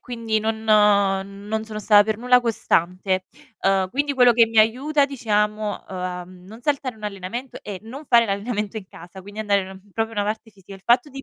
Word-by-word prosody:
quindi 230 -3 -2
non 220 0 -1
uhm, 200 -2 +3
non 220 +1 -2
sono 215 -1 -7
sta 210 0 +6
per 215 0 -2
nulla 250 +1 +4
costante. 185 -4 0 0.3
Uhm, 195 -1 +2
quindi 285 +1 -1
quello 250 -2 +6
che 230 0 +6
mi 225 0 0
aiuta 275 +7 +3
diciamo, 210 -5 -1
uhm, - - -8
a 180 -1 -4
non 185 +5 -14
saltare 270 -3 -1
1 215 - -11
allenamento, 205 +6 -6
è 200 -3 -6
non 265 +7 -9
fare 235 -3 +5
l'allenamento 210 +1 -3
in 190 -3 -7
casa, 175 +3 -12
quindi 205 +2 -11
andare 205 -2 +2
ehm, 190 +1 -11
proprio 225 0 -1
una 205 -2 -1
parte 220 +2 -4
ci 200 -2 -23
sia 195 +1 -12
il 195 - -15
fatto 245 +4 +3
di 275 -1 -9
215 Hz, 210 wpm, -22 LUFS, 195-235 Hz, 0.3 s, sta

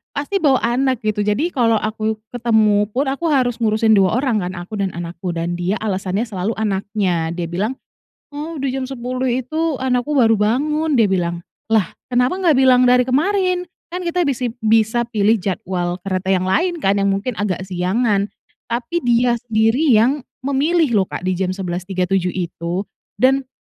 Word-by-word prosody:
pasti 290 +8 -1
bawa 280 -6 +3
anak 255 +1 +1
gitu, 210 -1 0
jadi 270 +12 +1
kalau 235 -6 +2
aku 215 0 -2 0.2
ketemu 220 -4 +2
pun 275 +3 +1
aku 275 +5 -4
harus 255 -6 +1
ngurusin 220 -1 +3
2 190 +2 +3
orang 255 -6 +1
kan, 180 -1 -4
aku 175 +5 -7
dan 195 -2 -1
anakku 175 +1 -5
dan 170 +1 -2
dia 180 +3 0
alasannya 195 0 -1
selalu 210 0 -3
anaknya. 195 -5 -1
Dia 175 - -2
bilang, 200 +10 -2 0.6
"oh, 310 +2 -5
di 270 -1 -2
jam 270 - -2
10 255 0 -3
itu 295 +5 -1
anakku 255 +1 0
baru 230 -5 +4
bangun," 280 +7 +1
dia 220 - +5
bilang. 175 -3 -1 0.3
Lah 215 -5 +3 0.2
kenapa 250 +5 +2
gak 320 -6 +4
bilang 255 -1 +5
dari 250 0 +5
kemarin? 365 +6 +1 0.3
Kan 365 - -3
kita 350 0 0
bisip 250 -3 -2
bisa 225 +2 +2
pilih 220 -1 +2
jadwal 180 -1 -3
kereta 185 0 -2
yang 185 0 0
lain 345 - +1
kan 200 +1 +2
yang 200 0 +2
mungkin 215 +5 -3
agak 190 -3 -1
siangan. 195 +3 0 0.4
Tapi 245 +9 -2
dia 240 0 +3
sendiri 225 +5 +1
yang 255 +6 +3 0.2
memilih 295 +3 +1
loh, 190 - +1
Kak, - - -6
di 185 -1 -1
jam 185 -1 -1
11.37 185 0 -2
itu. 175 0 -3 0.3
Dan 265 +1 +2
225 Hz, 170 wpm, -19 LUFS, 190-260 Hz, 0.6 s, dia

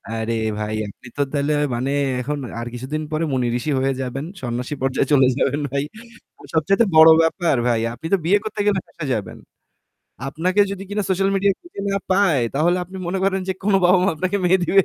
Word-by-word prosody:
আরে 115 0 -2 0.3
ভাই, 105 0 -3
আপনি 100 - -14
তো 145 - +1
তাইলে 145 +1 0 0.2
মানে 130 +3 -1 0.3
এখন 145 +4 -3 0.2
আর 115 - -5
কিছুদিন 135 +6 -4
পরে 155 +2 0
মুনি 125 -2 +1
ঋষি 125 +5 -3
হয়ে 135 +1 +1
যাবেন। 130 +2 -4 0.2
সন্ন্যাসী 125 +2 -3
পর্যায়ে 135 0 +1
চলে 135 -3 +6
যাবেন 145 - +1
ভাই। 140 +1 -1 0.7
সবচাইতে 195 +8 +3
বড় 160 +1 +10
ব্যাপার 165 -2 +1
ভাই, 115 -2 +2
আপনি 160 - -8
তো - - +6
বিয়ে 195 +5 +4
করতে 215 -1 -5
গেলে 205 -2 +3
ফেসে 160 -3 -7
যাবেন। 105 -4 -5 0.9
আপনাকে 180 +7 0
যদি 195 -1 -5
কিনা 205 +1 -1
সোশ্যাল 195 +1 +1
মিডিয়াতে 200 - -1
না 195 - 0
পায় 185 -9 +3
তাহলে 170 +5 +2
আপনি 185 +2 -11
মনে 190 +2 -1
করেন 190 -1 +1
যে - - +2
কোনো 195 0 +3
বাবা-মা 180 +1 +4
আপনাকে 185 +5 -1
মেয়ে 185 +1 +4
দিবে? 195 +3 +4
160 Hz, 190 wpm, -21 LUFS, 135-190 Hz, 0.9 s, বড়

